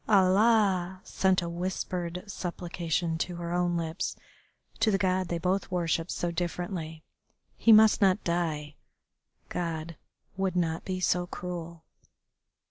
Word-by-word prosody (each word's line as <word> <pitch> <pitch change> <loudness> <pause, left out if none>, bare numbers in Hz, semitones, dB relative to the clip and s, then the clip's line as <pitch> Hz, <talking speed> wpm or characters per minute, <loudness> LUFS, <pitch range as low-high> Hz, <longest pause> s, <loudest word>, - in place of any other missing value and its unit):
Allah!" 190 -2 +4
sent 190 -1 +1
a - - -3
whispered 175 0 -3
supplication 170 -3 -3
to 175 +1 -2
her 170 0 -5
own 175 -1 +1
lips 165 +3 -3 0.6
to 220 - +3
the 195 - +3
God 185 -1 +1
they 170 - -1
both 185 +3 0
worshipped 170 -2 0
so 175 - -2
differently. 170 -2 -4 0.5
He 230 - +4
must 220 0 +7
not 195 +1 +4
die. 155 -4 -2 0.7
God 165 -2 -3 0.4
would 190 -1 -1
not 165 -2 0
be 185 -1 -3
so 180 0 +1
cruel. 170 -2 -6
175 Hz, 130 wpm, -29 LUFS, 170-185 Hz, 0.7 s, must